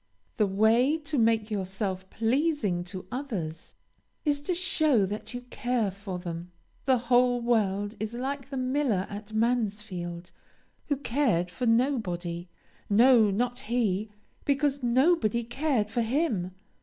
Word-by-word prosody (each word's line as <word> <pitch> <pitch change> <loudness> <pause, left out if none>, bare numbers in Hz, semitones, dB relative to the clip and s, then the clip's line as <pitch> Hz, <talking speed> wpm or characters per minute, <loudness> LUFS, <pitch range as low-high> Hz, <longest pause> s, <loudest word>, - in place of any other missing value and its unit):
The 210 -3 +3
way 225 +9 +3
to 295 -3 -2
make 225 -1 +2
yourself 190 -1 -2
pleasing 230 - 0
to 185 0 -7
others, 200 - -5 0.5
is 290 -1 +1
to 350 +5 -1
show 310 - +2
that 210 +5 -5
you 245 - -4
care 240 -5 0
for 195 -1 -6
them. 175 0 -6 0.3
The 260 -1 +4
whole 245 +1 +3
world 205 -4 +1
is 220 +2 -4
like 270 +2 -4
the 275 - -4
miller 255 -6 +1
at 205 +1 -7
Mansfield, 210 -7 -2 0.6
"who 285 - 0
cared 230 -10 +1
for 250 +5 -2
nobody 185 -9 0 0.4
no, 230 +1 +6
not 245 +5 -1
he 215 -4 0 0.3
because 280 0 +1
nobody 245 - +3
cared 240 -3 -1
for 235 - 0
him." 225 - 0
230 Hz, 130 wpm, -28 LUFS, 195-260 Hz, 0.6 s, no